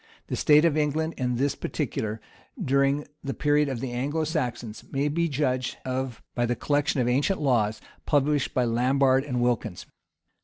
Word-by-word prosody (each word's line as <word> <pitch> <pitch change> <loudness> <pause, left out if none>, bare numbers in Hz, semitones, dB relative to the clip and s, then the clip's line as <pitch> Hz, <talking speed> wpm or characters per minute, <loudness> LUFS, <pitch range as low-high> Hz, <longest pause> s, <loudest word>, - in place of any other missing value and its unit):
The - - -1
state 150 +2 +5
of 165 -3 +3
England 155 +2 0
in 125 -1 -1
this 135 +3 +1
particular, 115 -7 -3 0.4
during 140 +2 +2 0.2
the 135 - -3
period 150 0 +2
of 125 -4 -4
the 130 - -3
Anglo 145 +6 -1
Saxons, 125 -8 -3
may 140 +2 0
be 170 +3 0
judged 130 -3 -1
of 130 -2 -3
by 120 -1 0
the 120 - 0
collection 145 +1 0
of 120 - +1
ancient 140 +10 +1
laws, 115 -7 +1 0.3
published 145 -1 +2
by 125 - +3
Lambard 130 +3 +3
and 125 -4 -2
Wilkins. 115 -6 -1
135 Hz, 165 wpm, -26 LUFS, 125-150 Hz, 0.4 s, state